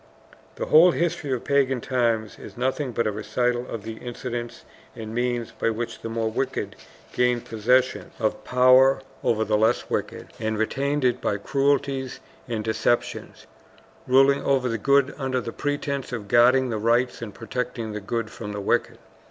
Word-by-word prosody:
The -, -, -3 dB
whole 165 Hz, +4 st, +7 dB
history 165 Hz, -4 st, -1 dB
of 125 Hz, -3 st, -1 dB
pagan 135 Hz, -2 st, +2 dB
times 115 Hz, -3 st, -1 dB
is -, -, -11 dB
nothing 130 Hz, +2 st, -1 dB
but 115 Hz, 0 st, -1 dB
a 110 Hz, -, +1 dB
recital 120 Hz, +4 st, -1 dB
of 110 Hz, -3 st, -6 dB
the 110 Hz, 0 st, -7 dB
incidents 120 Hz, -1 st, -6 dB, 0.3 s
and 110 Hz, -2 st, -7 dB
means 120 Hz, -1 st, -1 dB
by -, -, -1 dB
which 115 Hz, +1 st, -4 dB
the 115 Hz, -, -5 dB
more 115 Hz, -1 st, -1 dB
wicked 135 Hz, +4 st, -3 dB, 0.4 s
gained 125 Hz, -1 st, +1 dB
possession 125 Hz, +4 st, +1 dB
of 110 Hz, -2 st, -1 dB
power 130 Hz, +1 st, +5 dB, 0.2 s
over 110 Hz, -1 st, +2 dB
the 105 Hz, 0 st, +1 dB
less 110 Hz, +2 st, +1 dB
wicked, -, -, -4 dB
and 110 Hz, -1 st, -2 dB
retained 140 Hz, +5 st, 0 dB
it 125 Hz, 0 st, +1 dB
by 100 Hz, -, 0 dB
cruelties 135 Hz, +2 st, 0 dB, 0.3 s
and 115 Hz, -3 st, -3 dB
deceptions, 115 Hz, +2 st, -1 dB, 0.6 s
ruling 135 Hz, +2 st, +5 dB
over 135 Hz, -2 st, +1 dB
the 115 Hz, -1 st, -2 dB
good 140 Hz, +2 st, +3 dB
under 130 Hz, -2 st, -1 dB
the 115 Hz, -1 st, -6 dB
pretense 145 Hz, -1 st, -3 dB
of 110 Hz, -5 st, -5 dB
guarding 125 Hz, +3 st, +4 dB
the 110 Hz, -, -2 dB
right 120 Hz, +3 st, +1 dB
and 110 Hz, -4 st, -7 dB
protecting 120 Hz, -1 st, -4 dB
the 105 Hz, 0 st, -5 dB
good 115 Hz, +2 st, -3 dB
from 105 Hz, -2 st, -7 dB
the 105 Hz, -, -4 dB
wicked. 100 Hz, -, 0 dB
120 Hz, 170 wpm, -24 LUFS, 115-130 Hz, 0.6 s, whole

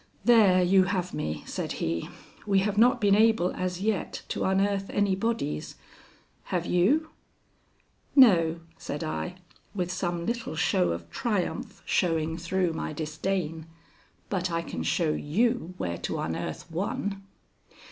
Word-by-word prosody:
"There 205 Hz, -6 st, +6 dB
you 190 Hz, +1 st, +5 dB
have 185 Hz, -1 st, -2 dB
me," 75 Hz, 0 st, -3 dB
said -, -, -4 dB
he. 80 Hz, +1 st, -2 dB, 0.4 s
"We 195 Hz, -1 st, +3 dB
have 205 Hz, +1 st, 0 dB
not 245 Hz, +3 st, +5 dB
been 205 Hz, -3 st, +4 dB
able 220 Hz, -3 st, +4 dB
as 180 Hz, 0 st, -3 dB
yet 210 Hz, -3 st, -1 dB
to -, -, -1 dB
unearth 195 Hz, +1 st, +1 dB
any 205 Hz, -2 st, +1 dB
bodies. 195 Hz, -, -2 dB, 0.7 s
Have 175 Hz, -2 st, -2 dB
you?" 270 Hz, -, +2 dB, 1.0 s
"No," 170 Hz, -, +6 dB, 0.2 s
said 145 Hz, +3 st, -4 dB
I, 175 Hz, +3 st, -3 dB, 0.4 s
with 180 Hz, -2 st, -1 dB
some 175 Hz, -2 st, -2 dB
little 235 Hz, -5 st, -3 dB
show 90 Hz, -, +2 dB
of 85 Hz, 0 st, -4 dB
triumph 220 Hz, -, -2 dB
showing 165 Hz, -3 st, +1 dB
through 175 Hz, 0 st, 0 dB
my 160 Hz, -, -4 dB
disdain, 160 Hz, +1 st, -3 dB, 0.6 s
"but 185 Hz, -2 st, -1 dB
I 165 Hz, 0 st, -1 dB
can 80 Hz, -, -5 dB
show 155 Hz, -, +1 dB
you 185 Hz, +4 st, 0 dB
where 85 Hz, -1 st, -3 dB
to -, -, -3 dB
unearth 80 Hz, -, -4 dB
one." 195 Hz, +3 st, -2 dB
180 Hz, 135 wpm, -27 LUFS, 160-205 Hz, 1.0 s, There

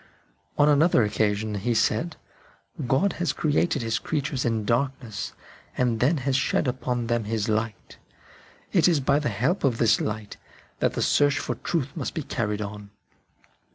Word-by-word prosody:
On 145 Hz, -, +5 dB
another 150 Hz, -3 st, +4 dB
occasion 105 Hz, 0 st, 0 dB
he 105 Hz, +4 st, -1 dB
said: 120 Hz, +10 st, +1 dB, 0.4 s
" 100 Hz, +8 st, -10 dB
God 175 Hz, +11 st, +2 dB
has 165 Hz, -5 st, +1 dB
created 150 Hz, -2 st, +1 dB
His 115 Hz, -1 st, 0 dB
creatures 145 Hz, -4 st, -2 dB
in 110 Hz, -3 st, 0 dB
darkness, 120 Hz, -2 st, -2 dB, 0.4 s
and 120 Hz, -3 st, +1 dB
then 145 Hz, +8 st, +3 dB
has 135 Hz, -2 st, +1 dB
shed 135 Hz, 0 st, +1 dB
upon 125 Hz, -1 st, -2 dB
them 120 Hz, -1 st, 0 dB
His 110 Hz, -1 st, -1 dB
light." 110 Hz, 0 st, -3 dB, 0.8 s
It 170 Hz, -3 st, +5 dB
is 170 Hz, -4 st, +3 dB
by 140 Hz, +2 st, +2 dB
the 145 Hz, -4 st, -1 dB
help 125 Hz, -, 0 dB
of 130 Hz, -5 st, +2 dB
this 115 Hz, -2 st, +3 dB
light 105 Hz, -1 st, -4 dB, 0.4 s
that -, -, +1 dB
the -, -, -1 dB
search 145 Hz, +1 st, +3 dB
for -, -, -2 dB
truth 150 Hz, -6 st, -3 dB
must 145 Hz, -6 st, -4 dB
be 160 Hz, -, -2 dB
carried 105 Hz, -4 st, -2 dB
on. 105 Hz, 0 st, -8 dB
120 Hz, 165 wpm, -25 LUFS, 110-145 Hz, 0.8 s, On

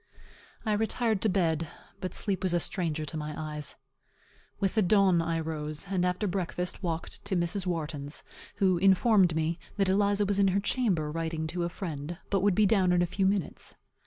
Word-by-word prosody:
I 215 Hz, -, +1 dB
retired 220 Hz, 0 st, +1 dB
to 220 Hz, -, +3 dB
bed, 165 Hz, -4 st, +1 dB, 0.3 s
but 185 Hz, -, -5 dB
sleep 200 Hz, -3 st, -2 dB
was 185 Hz, -2 st, +1 dB
a -, -, +3 dB
stranger 160 Hz, -3 st, -1 dB
to 160 Hz, +2 st, -5 dB
my 150 Hz, 0 st, -4 dB
eyes. 150 Hz, -1 st, -5 dB, 0.8 s
With 195 Hz, -2 st, +1 dB
the 220 Hz, -, +3 dB
dawn 190 Hz, -2 st, +4 dB
I 165 Hz, 0 st, -1 dB
rose; 155 Hz, -1 st, -3 dB
and 185 Hz, -2 st, +1 dB
after 180 Hz, +3 st, 0 dB
breakfast 180 Hz, -1 st, -3 dB
walked 165 Hz, -3 st, -4 dB
to 200 Hz, -1 st, 0 dB
Mrs. 180 Hz, +2 st, +1 dB
Wharton's, 150 Hz, -4 st, -3 dB, 0.3 s
who 185 Hz, -3 st, +2 dB
informed 195 Hz, -2 st, +4 dB
me, 160 Hz, +1 st, 0 dB, 0.2 s
that 195 Hz, -2 st, +2 dB
Eliza 205 Hz, +1 st, +2 dB
was 200 Hz, 0 st, 0 dB
in 200 Hz, -, +5 dB
her 190 Hz, +1 st, +2 dB
chamber, 195 Hz, -9 st, +1 dB
writing 160 Hz, 0 st, -2 dB
to 170 Hz, +2 st, -2 dB
a -, -, -2 dB
friend, 165 Hz, -3 st, -5 dB
but 195 Hz, -2 st, +2 dB
would 200 Hz, -2 st, +3 dB
be 215 Hz, -, +4 dB
down 190 Hz, -3 st, +3 dB
in 175 Hz, 0 st, +3 dB
a -, -, +2 dB
few 190 Hz, +2 st, 0 dB
minutes. 195 Hz, -4 st, -2 dB
180 Hz, 190 wpm, -29 LUFS, 160-200 Hz, 0.8 s, in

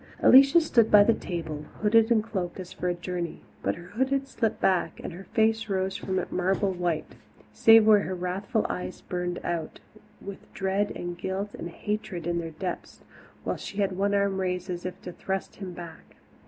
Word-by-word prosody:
Alicia 275 Hz, +5 st, +8 dB
stood 240 Hz, -9 st, +3 dB
by 205 Hz, -1 st, +8 dB
the 230 Hz, -, +4 dB
table, 160 Hz, -6 st, -5 dB, 0.2 s
hooded 225 Hz, +1 st, +5 dB
and 225 Hz, -3 st, +3 dB
cloaked 190 Hz, -5 st, -4 dB
as 185 Hz, -1 st, -8 dB
for 180 Hz, -, -2 dB
a -, -, +1 dB
journey, 175 Hz, -1 st, -4 dB, 0.2 s
but -, -, 0 dB
her 175 Hz, +1 st, -12 dB
hood 260 Hz, +7 st, 0 dB
had 275 Hz, 0 st, 0 dB
slipped 225 Hz, -5 st, -1 dB
back, 185 Hz, -2 st, +1 dB
and -, -, -5 dB
her 190 Hz, +3 st, -10 dB
face 225 Hz, 0 st, +1 dB
rose 190 Hz, 0 st, -1 dB
from 190 Hz, 0 st, -3 dB
it 185 Hz, -, -2 dB
marble 190 Hz, +2 st, +1 dB
white, 175 Hz, -3 st, -2 dB, 0.4 s
save 225 Hz, -1 st, +7 dB
where 215 Hz, -1 st, +7 dB
her 185 Hz, -1 st, -3 dB
wrathful 190 Hz, +6 st, -2 dB
eyes 180 Hz, 0 st, -5 dB
burned 180 Hz, -1 st, -3 dB
out, 170 Hz, -2 st, -3 dB, 0.4 s
with 200 Hz, 0 st, -10 dB
dread 195 Hz, +1 st, 0 dB
and 175 Hz, 0 st, -5 dB
guilt 195 Hz, +2 st, -3 dB
and 170 Hz, -, -6 dB
hatred 195 Hz, -1 st, -4 dB
in 170 Hz, 0 st, 0 dB
their 165 Hz, -1 st, -4 dB
depths, 180 Hz, +3 st, -6 dB, 0.4 s
while -, -, -2 dB
she 200 Hz, -, -8 dB
had 195 Hz, -2 st, 0 dB
one 200 Hz, +2 st, +1 dB
arm 200 Hz, -1 st, +1 dB
raised 180 Hz, 0 st, -2 dB
as 175 Hz, +1 st, -4 dB
if 185 Hz, -, -7 dB
to 180 Hz, -, -6 dB
thrust 190 Hz, +2 st, -4 dB
him 190 Hz, -3 st, -6 dB
back. 170 Hz, -1 st, -11 dB
190 Hz, 195 wpm, -27 LUFS, 175-210 Hz, 0.4 s, Alicia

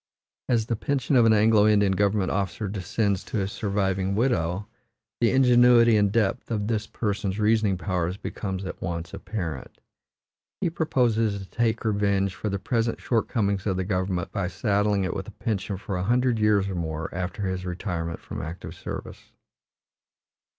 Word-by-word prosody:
As 115 Hz, -3 st, +2 dB
the 115 Hz, -, -1 dB
pension 135 Hz, +3 st, 0 dB
of 120 Hz, -2 st, +6 dB
an 110 Hz, -, +6 dB
Anglo 105 Hz, 0 st, +5 dB
Indian 105 Hz, -2 st, +4 dB
government 100 Hz, 0 st, +1 dB
officer 100 Hz, +1 st, -2 dB
descends 100 Hz, +1 st, -1 dB
to -, -, -4 dB
his 100 Hz, -1 st, -1 dB
surviving 95 Hz, -2 st, -1 dB
widow, 105 Hz, -5 st, 0 dB, 0.5 s
the 115 Hz, -, +4 dB
ingenuity 120 Hz, -2 st, +6 dB
and 100 Hz, -2 st, +3 dB
depth 115 Hz, +2 st, 0 dB
of 105 Hz, -3 st, -1 dB
this 110 Hz, -1 st, -1 dB
person's 100 Hz, -2 st, -2 dB
reasoning 105 Hz, -2 st, +2 dB
powers 90 Hz, -1 st, -2 dB
becomes 95 Hz, -2 st, -4 dB
at 90 Hz, -, -7 dB
once 85 Hz, -1 st, -4 dB
apparent. 90 Hz, -8 st, -5 dB, 0.8 s
He 170 Hz, -, 0 dB
proposes 115 Hz, -10 st, +1 dB
to 95 Hz, -, -8 dB
take 115 Hz, +3 st, -1 dB
revenge 100 Hz, -2 st, +1 dB
for 105 Hz, -, -4 dB
the 100 Hz, -, -1 dB
present 115 Hz, +2 st, -1 dB
shortcomings 105 Hz, -4 st, 0 dB
of 95 Hz, -2 st, 0 dB
the 95 Hz, -, 0 dB
government 95 Hz, -2 st, -1 dB
by 100 Hz, -3 st, -1 dB
saddling 100 Hz, +1 st, +1 dB
it 90 Hz, -, -1 dB
with 95 Hz, -, -5 dB
a -, -, -8 dB
pension 100 Hz, -4 st, -2 dB
for 100 Hz, 0 st, -5 dB
a 90 Hz, -, -1 dB
hundred 120 Hz, +2 st, +2 dB
years 105 Hz, -2 st, +3 dB
or 100 Hz, -, -3 dB
more 80 Hz, -2 st, -4 dB
after 90 Hz, +3 st, -4 dB
his 95 Hz, -1 st, -2 dB
retirement 90 Hz, -2 st, -4 dB
from -, -, -6 dB
active 80 Hz, +3 st, -7 dB
service. -, -, -8 dB
100 Hz, 165 wpm, -26 LUFS, 95-110 Hz, 0.8 s, of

